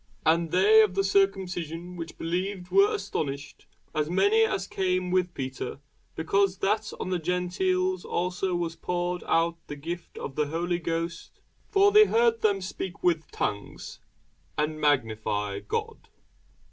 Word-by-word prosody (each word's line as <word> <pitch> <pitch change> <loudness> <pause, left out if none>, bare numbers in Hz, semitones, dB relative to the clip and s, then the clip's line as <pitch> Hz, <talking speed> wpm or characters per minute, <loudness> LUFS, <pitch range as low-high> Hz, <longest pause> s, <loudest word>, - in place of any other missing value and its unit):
And 165 +1 +3
they 205 +6 +6
of 205 -4 +2
the 195 - +2
circumcision 180 -3 0
which 165 -2 -7
believed 180 +2 -3
were 400 +2 +5
astonished, 140 - -4 0.3
as 155 0 0
many 200 +5 +4
as 195 -3 0
came 185 -2 -1
with 180 -1 +1
Peter, 130 -1 -5 0.4
because 195 +4 +1
that 215 +2 0
on 185 - -3
the 180 - +1
Gentiles 185 +1 0
also 180 +1 -1
was 170 -1 -2
poured 175 0 -2
out 165 0 +2
the 145 - -6
gift 170 +4 -7
of 135 - -5
the 150 +1 0
Holy 170 +3 -1
Ghost. 165 0 -4 0.3
For 400 -1 +5
they 425 +1 +8
heard 230 - +2
them 200 -2 +2
speak 185 0 -6
with 165 -3 +1
tongues, 100 0 -4 0.6
and 155 0 -1
magnify 110 -7 0
God. 105 - -4
180 Hz, 145 wpm, -27 LUFS, 160-195 Hz, 0.6 s, they